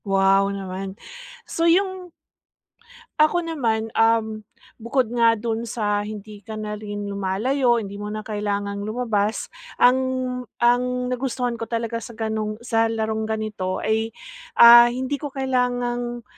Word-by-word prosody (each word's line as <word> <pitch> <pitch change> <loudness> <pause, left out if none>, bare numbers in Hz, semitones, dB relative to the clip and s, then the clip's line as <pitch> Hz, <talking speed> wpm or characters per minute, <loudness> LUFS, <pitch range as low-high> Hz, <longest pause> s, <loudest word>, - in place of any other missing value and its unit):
Wow 195 0 +3
naman. 195 0 -5 0.5
So, 335 0 +1
'yung 375 0 +1 1.1
ako 310 +3 +4
naman, 230 -9 -1
um, 225 -1 +2 0.4
bukod 235 0 0
nga 230 -1 +4
dun 225 +1 -2
sa 210 -2 -1
hindi 210 0 -8
ka 220 +2 -8
na 215 0 -4
rin 205 -1 -5
lumalayo, 230 +7 +1
hindi 200 -2 -5
mo 210 - -4
na 215 0 -5
kailangang 205 -1 -2
lumabas. 215 -2 -1 0.4
Ang 250 +1 +6 0.6
ang 250 +1 +2
nagustuhan 245 -2 -2
ko 230 - -4
talaga 230 0 -2
sa 235 0 -10
ganung 220 -1 -2
sa 225 -1 +2
larong 220 -1 -2
ganito 215 -4 -2
ay, 220 +1 0 0.5
ah, 235 0 +10
hindi 260 +3 -3
ko 295 - -3
kailangang, 245 -2 -1
225 Hz, 130 wpm, -23 LUFS, 210-245 Hz, 1.1 s, ah